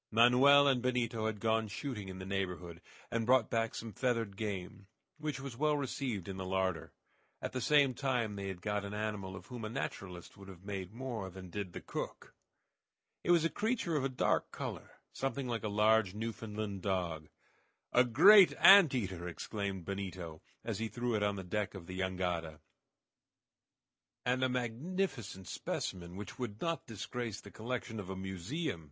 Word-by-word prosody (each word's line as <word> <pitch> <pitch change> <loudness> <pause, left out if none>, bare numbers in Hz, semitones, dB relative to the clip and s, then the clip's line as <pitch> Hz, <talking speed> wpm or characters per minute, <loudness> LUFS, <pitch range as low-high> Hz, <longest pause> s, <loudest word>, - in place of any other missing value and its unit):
Manoel 125 +5 +7
and 130 -3 +3
Benito 120 -3 0
had 105 -2 -3
gone 110 0 +1
shooting 105 -2 -5
in 95 - -7
the 95 - -6
neighborhood, 90 -3 -3 0.3
and 115 -1 0
brought 125 -1 +4
back 115 -1 0
some 115 -2 -6
feathered 115 -5 0
game, 100 -1 -5 0.3
which 150 -4 -3
was 135 -3 -6
well 150 +3 +2
received 130 - -2
in 95 -1 -5
the 95 - -3
larder. 95 -2 -1 0.5
At - - -4
the 130 - -3
same 145 -2 +5
time 125 -5 0
they 100 -1 -4
had 95 -2 -6
got 105 -1 -1
an 100 +1 -5
animal 105 -3 -3
of 90 -1 -9
whom 120 -2 -7
a 110 - -3
naturalist 90 -5 -5
would 100 -1 -12
have 95 -1 -12
made 95 -2 -4
more 115 -5 -4
than 95 -1 -10
did 100 -3 -4
the - - -6
cook. - - -6 0.9
It - - -4
was 170 -2 +5
a - - +3
creature 210 -6 0
of 145 - +1
a 135 - +1
dark 130 - +1
color, - - -6 0.2
something 135 0 -2
like 115 -3 -2
a - - 0
large 105 -1 +3
Newfoundland 105 -2 -4
dog. 85 -5 -2 0.6
"A 125 - +7
great 180 - +8
ant 190 -8 +9
eater!" 95 -7 -2
exclaimed 95 +1 -4
Benito, 90 -5 -5 0.2
as - - -3
he 115 - -1
threw 120 +1 -2
it 105 - +1
on 105 0 +1
the 95 - -5
deck 105 +3 -2
of 90 -3 -8
the 95 +2 -6
jangada. 90 -4 -2 1.7
"And 125 +1 +2
a 130 - +3
magnificent 125 - -2
specimen 90 -1 -4
which 100 +3 -8
would 110 -4 -4
not 165 -1 -2
disgrace 115 0 -4
the - - -12
collection 115 -1 -4
of 95 -2 -7
a 95 - -3
museum!" 95 - -3
110 Hz, 180 wpm, -34 LUFS, 95-125 Hz, 1.7 s, ant